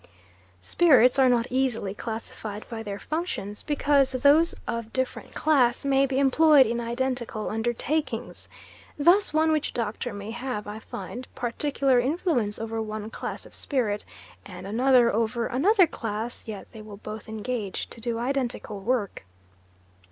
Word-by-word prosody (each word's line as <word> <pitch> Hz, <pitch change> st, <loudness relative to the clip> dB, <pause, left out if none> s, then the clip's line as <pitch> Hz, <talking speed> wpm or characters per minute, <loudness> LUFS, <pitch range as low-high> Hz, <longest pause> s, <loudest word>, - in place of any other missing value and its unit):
Spirits 260 Hz, -, +5 dB
are 260 Hz, -1 st, +6 dB
not 235 Hz, -2 st, +3 dB
easily 250 Hz, -6 st, 0 dB
classified 220 Hz, -1 st, -6 dB
by 225 Hz, -2 st, -5 dB
their 205 Hz, -2 st, -5 dB
functions 210 Hz, -, -4 dB
because 285 Hz, -2 st, +2 dB
those 285 Hz, +6 st, +4 dB
of 230 Hz, -1 st, -3 dB
different 260 Hz, 0 st, -3 dB
class 260 Hz, -5 st, +2 dB
may 275 Hz, 0 st, +3 dB
be 265 Hz, 0 st, -2 dB
employed 280 Hz, +1 st, +6 dB
in 235 Hz, +2 st, -1 dB
identical 235 Hz, -2 st, -2 dB
undertakings. 240 Hz, +7 st, -2 dB, 0.5 s
Thus 345 Hz, +7 st, +4 dB
one 315 Hz, +1 st, +3 dB
witch 310 Hz, -2 st, 0 dB
doctor 225 Hz, -3 st, -3 dB
may 205 Hz, +1 st, -7 dB
have, 240 Hz, -3 st, -4 dB
I 210 Hz, +1 st, -6 dB
find, 230 Hz, +4 st, -7 dB
particular 265 Hz, +1 st, +1 dB
influence 255 Hz, -, 0 dB
over 225 Hz, 0 st, -3 dB
one 215 Hz, 0 st, -5 dB
class -, -, -6 dB
of -, -, -15 dB
spirit 220 Hz, -7 st, -1 dB, 0.4 s
and 185 Hz, -1 st, -10 dB
another 245 Hz, +3 st, +4 dB
over 230 Hz, +2 st, 0 dB
another 370 Hz, -, +4 dB
class; 225 Hz, -5 st, -5 dB
yet 210 Hz, -3 st, -6 dB
they 220 Hz, -, -10 dB
will 210 Hz, -1 st, -10 dB
both 215 Hz, +1 st, -8 dB
engage 220 Hz, -2 st, -4 dB
to 230 Hz, -, -11 dB
do 235 Hz, 0 st, -2 dB
identical 245 Hz, -4 st, -2 dB
work. 210 Hz, -, -1 dB
240 Hz, 145 wpm, -26 LUFS, 220-275 Hz, 0.5 s, are